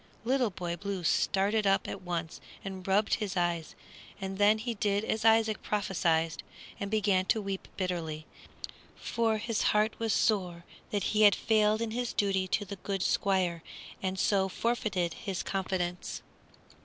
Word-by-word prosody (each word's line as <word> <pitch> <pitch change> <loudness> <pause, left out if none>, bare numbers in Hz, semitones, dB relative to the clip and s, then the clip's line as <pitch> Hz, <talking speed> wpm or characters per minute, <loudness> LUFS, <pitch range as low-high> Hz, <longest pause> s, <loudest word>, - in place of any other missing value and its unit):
Little 255 -1 +2
Boy 175 -2 -4
Blue 195 0 -4
started 200 +5 +2
up 195 -1 +2
at - - -5
once 175 -2 -4 0.2
and 190 -1 -6
rubbed 200 +2 +2
his 200 -3 -1
eyes; 170 -2 -1 0.4
and 195 0 -5
then 205 +1 +5
he 235 +2 -3
did 205 0 0
as 220 - -1
Isaac 225 -1 +4
prophesied, 165 -6 0 0.4
and 200 -2 -3
began 200 -3 +2
to 220 - +2
weep 195 -2 -4
bitterly, 165 -5 -3 0.7
for 225 -2 0
his 225 0 -1
heart 215 +1 +3
was 225 -1 0
sore 180 -6 +1 0.2
that 205 -2 -1
he 215 - +3
had 205 -1 +7
failed 215 0 +2
in 225 - -3
his 245 +1 -2
duty 195 -2 +1
to 205 +3 0
the 200 +1 -7
good 195 0 -3
Squire 185 -4 +1 0.4
and 190 0 -2
so 195 0 +2
forfeited 195 -6 -1
his 190 +1 -4
confidence. 180 -2 -3
195 Hz, 155 wpm, -30 LUFS, 180-215 Hz, 0.7 s, had